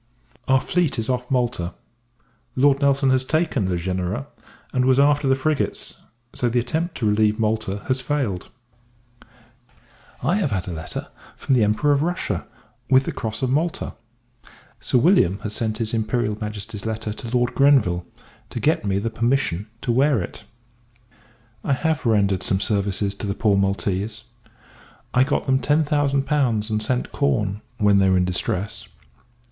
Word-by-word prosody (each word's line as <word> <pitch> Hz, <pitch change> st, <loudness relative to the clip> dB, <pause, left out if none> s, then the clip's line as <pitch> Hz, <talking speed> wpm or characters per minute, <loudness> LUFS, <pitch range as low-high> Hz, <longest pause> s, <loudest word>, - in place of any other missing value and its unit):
Our 130 Hz, 0 st, +5 dB
fleet 170 Hz, 0 st, 0 dB
is 115 Hz, +1 st, -1 dB
off 125 Hz, -1 st, -1 dB
Malta: 120 Hz, -9 st, -1 dB, 0.8 s
Lord 140 Hz, +1 st, +3 dB
Nelson 140 Hz, -1 st, +3 dB
has 130 Hz, 0 st, +3 dB
taken 135 Hz, -, 0 dB
Le 90 Hz, -, 0 dB
Genereux, 90 Hz, -4 st, -2 dB, 0.5 s
and 125 Hz, -1 st, +2 dB
was 130 Hz, 0 st, +4 dB
after 145 Hz, 0 st, +3 dB
the 135 Hz, -, +4 dB
frigates; 145 Hz, +2 st, -2 dB, 0.3 s
so 120 Hz, -, 0 dB
the 120 Hz, +1 st, +1 dB
attempt 160 Hz, +8 st, -2 dB
to 115 Hz, -, -2 dB
relieve 105 Hz, 0 st, +3 dB
Malta 110 Hz, -2 st, -1 dB
has 130 Hz, 0 st, +1 dB
failed. 125 Hz, -9 st, -2 dB, 1.7 s
I 170 Hz, +10 st, +2 dB
have 190 Hz, -9 st, +1 dB
had 95 Hz, -3 st, -2 dB
a -, -, -3 dB
letter 80 Hz, 0 st, -6 dB, 0.3 s
from -, -, 0 dB
the 120 Hz, -4 st, +4 dB
Emperor 110 Hz, +8 st, +2 dB
of 140 Hz, -1 st, +3 dB
Russia, 160 Hz, -, -2 dB, 0.4 s
with 130 Hz, 0 st, +5 dB
the -, -, -3 dB
Cross 110 Hz, +4 st, -4 dB
of 130 Hz, -, +1 dB
Malta. 160 Hz, +5 st, -1 dB, 0.9 s
Sir -, -, +1 dB
William 120 Hz, -, +4 dB
has 105 Hz, -, -5 dB
sent 110 Hz, -1 st, -2 dB
his 115 Hz, 0 st, -3 dB
Imperial 110 Hz, -1 st, 0 dB
Majesty's 105 Hz, 0 st, -5 dB
letter 110 Hz, -1 st, -3 dB
to 115 Hz, -, -7 dB
Lord 120 Hz, 0 st, +1 dB
Grenville, 135 Hz, -12 st, +4 dB, 0.5 s
to -, -, -5 dB
get -, -, +1 dB
me 100 Hz, -1 st, 0 dB
the 110 Hz, +3 st, -2 dB
permission 115 Hz, -5 st, 0 dB, 0.2 s
to 120 Hz, -, 0 dB
wear 135 Hz, +1 st, +3 dB
it. 110 Hz, -, -7 dB, 1.2 s
I 140 Hz, -, +1 dB
have 155 Hz, 0 st, 0 dB
rendered 100 Hz, -4 st, +2 dB
some 95 Hz, +1 st, +1 dB
services 100 Hz, -1 st, 0 dB
to 100 Hz, -, -6 dB
the 100 Hz, -, -2 dB
poor 105 Hz, -2 st, +2 dB
Maltese. 100 Hz, +2 st, -1 dB, 0.9 s
I 125 Hz, -, +5 dB
got 140 Hz, -, -1 dB
them 130 Hz, -1 st, +2 dB
ten 150 Hz, +3 st, +2 dB
thousand 145 Hz, -2 st, +1 dB
pounds, 120 Hz, -8 st, +1 dB
and 110 Hz, 0 st, 0 dB
sent 125 Hz, +3 st, -1 dB
corn 105 Hz, -8 st, 0 dB, 0.2 s
when 105 Hz, -3 st, +4 dB
they 95 Hz, -1 st, +4 dB
were 95 Hz, -, +4 dB
in 90 Hz, -, +2 dB
distress. 90 Hz, +2 st, -2 dB
115 Hz, 165 wpm, -22 LUFS, 100-135 Hz, 1.7 s, Our